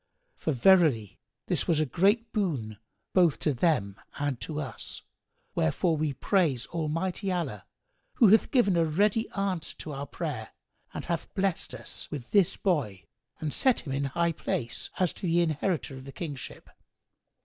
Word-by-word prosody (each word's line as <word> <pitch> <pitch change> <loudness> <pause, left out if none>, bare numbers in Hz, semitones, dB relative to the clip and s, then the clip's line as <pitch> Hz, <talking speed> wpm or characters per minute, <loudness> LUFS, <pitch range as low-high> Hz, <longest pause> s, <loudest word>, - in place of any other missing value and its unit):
For 160 - -2
verily, 145 - +4 0.3
this - - -1
was 160 -3 +3
a 155 - +3
great 205 - +2
boon 135 - -1 0.3
both 175 -6 +4
to 150 - +2
them 120 - +1 0.2
and 145 -4 -2
to 150 -2 -4
us; 140 - -7 0.5
wherefore 160 - +1
we 155 -2 0
praise 145 - +1
Almighty 170 +5 -2
Allah 140 - -3 0.5
who 225 - +6
hath 220 +3 +5
given 230 -8 +3
a 170 - +4
ready 205 +8 +2
answer 195 -5 -2
to 155 - -6
our 140 0 -5
prayer - - -5 0.4
and - - -6
hath 170 -2 -3
blessed 195 -3 -1
us - - -7
with 135 -5 -7
this 200 -5 +3
boy 125 - 0 0.4
and 155 -2 -3
set 260 -3 +3
him 135 - -5
in 140 +1 0
high 170 +5 +1
place, 120 -6 -3
as 185 -3 +1
the 170 -2 0
inheritor 160 -3 0
of 130 - -10
the 135 - -8
kingship. 145 -3 -7
160 Hz, 160 wpm, -28 LUFS, 135-185 Hz, 0.5 s, who